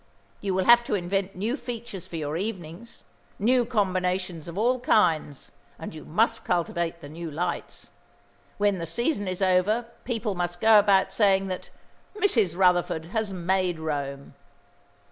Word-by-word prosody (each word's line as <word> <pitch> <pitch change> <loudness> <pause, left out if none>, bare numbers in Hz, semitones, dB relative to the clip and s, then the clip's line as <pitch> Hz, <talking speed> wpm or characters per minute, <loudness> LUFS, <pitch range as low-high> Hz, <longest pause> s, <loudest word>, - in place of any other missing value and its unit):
You 195 -2 -2
will 190 - +2
have 240 0 +7
to 210 - 0
invent 195 +1 -2
new 215 +7 -1
features 235 - -7
for - - -9
your 150 -1 -3
evenings, 190 +1 -6 0.3
new 245 +4 +3
combinations 185 -6 -1
of 170 +2 -7
all 245 +4 +2
kinds, 160 - +1 0.3
and - - -7
you - - -10
must - - +1
cultivate 170 -1 -1
the 145 - -9
new 165 +2 -6
lights. 170 +3 -4 0.7
When 205 -2 +1
the 165 - -4
season 230 - -1
is 185 +1 -2
over 205 +6 +2
people 225 -4 -2
must 175 -1 -3
go 220 +1 +7
about 195 -2 +3
saying 195 -2 +3
that 185 - -5 0.5
Mrs. 220 - +2
Rutherford 175 -3 +2
has 220 -3 -1
made 185 -1 0
Rome." 140 -3 -4
190 Hz, 150 wpm, -26 LUFS, 170-215 Hz, 0.7 s, have